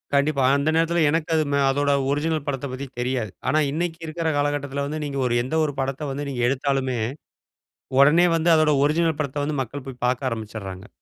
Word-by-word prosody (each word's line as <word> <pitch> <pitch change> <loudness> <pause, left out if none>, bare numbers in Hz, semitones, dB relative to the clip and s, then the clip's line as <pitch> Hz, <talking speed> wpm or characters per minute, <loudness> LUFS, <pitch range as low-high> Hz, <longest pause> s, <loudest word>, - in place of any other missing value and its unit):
கண்டிப்பா, 140 -1 +2
அந்த 145 +2 0
நேரத்தில 165 +1 +2
எனக்கு 165 +1 0
அது 155 - +3
ம - - +3
அதோட 145 +1 +1 0.2
ஒரிஜினல் 155 0 -1
படத்த 140 -1 -2
பத்தி 135 +2 -5
தெரியாது. 125 -5 -1 0.2
ஆனா 155 - +3
இன்னைக்கு 165 +1 -2
இருக்கற 165 +1 -3
காலகட்டத்துல 140 -1 -1
வந்து, 155 +2 -4
நீங்க 140 -1 -3
ஒரு 120 - 0
எந்த 130 +5 -3
ஒரு 145 - -3
படத்தை 135 +2 -3
வந்து 140 +1 -4
நீங்க 125 -3 -3
எடுத்தாலுமே, 135 -2 0 1.0
உடனே 160 +5 +6
வந்து 165 +1 +2
அதனுடைய 150 -3 +3
ஒரிஜினல் 160 0 +1
படத்தை 145 0 -3
வந்து 145 -2 -2
மக்கள் 135 +2 -6
போய் 125 -2 -8
பார்க்க 130 +1 0
ஆரம்பிச்சுறாங்க. 105 -3 -6
140 Hz, 185 wpm, -23 LUFS, 130-155 Hz, 1.0 s, உடனே